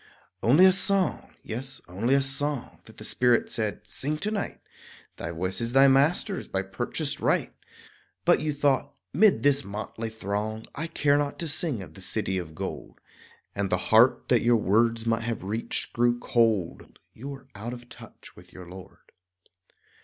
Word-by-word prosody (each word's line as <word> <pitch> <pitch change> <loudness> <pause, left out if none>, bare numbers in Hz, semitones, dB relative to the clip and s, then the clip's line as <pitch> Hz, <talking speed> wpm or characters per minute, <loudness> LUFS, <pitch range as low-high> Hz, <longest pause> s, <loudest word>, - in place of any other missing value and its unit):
Only 145 +11 +6
a 190 - +8
song, 195 0 +1
yes, 135 +4 -5
only 110 +9 +1
a 140 - +3
song 135 0 -2
That - - -14
the - - -8
Spirit 120 -2 +2
said 110 -2 -2
"Sing 150 +3 -2
to 210 +7 -3
night; 205 -2 -3 0.6
Thy 80 - -5
voice 95 +6 -3
is 115 +1 -3
thy 135 +1 +7
Master's 150 +9 +2
by 95 0 -2
purchased 95 - -3
right"; - - +1 0.7
But - - +5
you 155 0 0
thought, 140 -3 0 0.2
"'Mid 205 +6 +4
this 140 0 +4
motley 110 +2 -5
throng 110 +1 -4
I 160 +4 -3
care 145 -3 +2
not 145 -1 -2
to 170 - -3
sing 145 - -2
of 80 -4 -13
the - - -12
city 95 -1 -1
of 80 -3 -8
gold" - - -6 0.5
And 100 -1 -2
the 90 - +2 0.2
heart 115 +4 +5
that 120 - +4
your 120 0 +4
words 115 +2 +2
might 115 0 +1
have 115 -3 -3
reached 110 +4 -3
grew 120 0 +2
cold; 110 -8 0 0.2
You 135 +5 -8
were 135 -1 -9
"out 110 +4 -6
of 120 0 -9
touch" - - -14
with 90 +1 -16
your 90 -1 -11
Lord. 90 +1 -13
120 Hz, 175 wpm, -26 LUFS, 105-140 Hz, 0.7 s, a